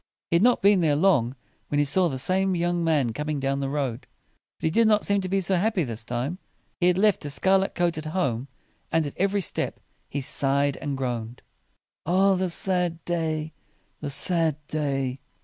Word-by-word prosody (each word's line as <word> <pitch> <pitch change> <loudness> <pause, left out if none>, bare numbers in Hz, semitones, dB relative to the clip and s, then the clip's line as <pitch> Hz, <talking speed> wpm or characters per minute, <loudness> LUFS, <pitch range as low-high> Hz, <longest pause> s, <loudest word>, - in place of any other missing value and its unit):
He 170 - +5
had - - +1
not 245 -1 +3
been 200 -2 +5
there 155 -3 +3
long 140 -8 +2 0.3
when 145 - -1
he 145 - +3
saw 180 +5 +2
the 135 - -4
same 185 +7 +1
young 175 0 0
man 145 -8 +1
coming 150 +1 -3
down 135 0 -1
the 135 -1 -2
road. 135 -4 -3 0.5
But - - -22
he 160 - +2
did 230 +5 +4
not 210 -1 +3
seem 200 -1 +2
to 185 - -4
be 195 +1 +1
so 185 +1 +1
happy 205 -1 +1
this 115 -4 -5
time. 125 +10 -3 0.4
He 175 - +3
had 180 0 +3
left 210 +1 +3
his 145 -1 -1
scarlet 195 0 +2
coat 170 -2 0
at 155 - -8
home, 140 -7 -1 0.4
and 165 -1 +2
at 145 - -5
every 200 +1 +1
step - - -2 0.3
he 140 - -3
sighed 140 +1 0
and 145 -3 -4
groaned. 120 -2 -4 0.6
"Ah 190 +3 +4
the 185 -1 0
sad 175 -2 -1
day! 160 -2 -2 0.5
the 145 - -4
sad 160 +2 +2
day!" 135 -4 -2
160 Hz, 200 wpm, -25 LUFS, 140-185 Hz, 0.6 s, He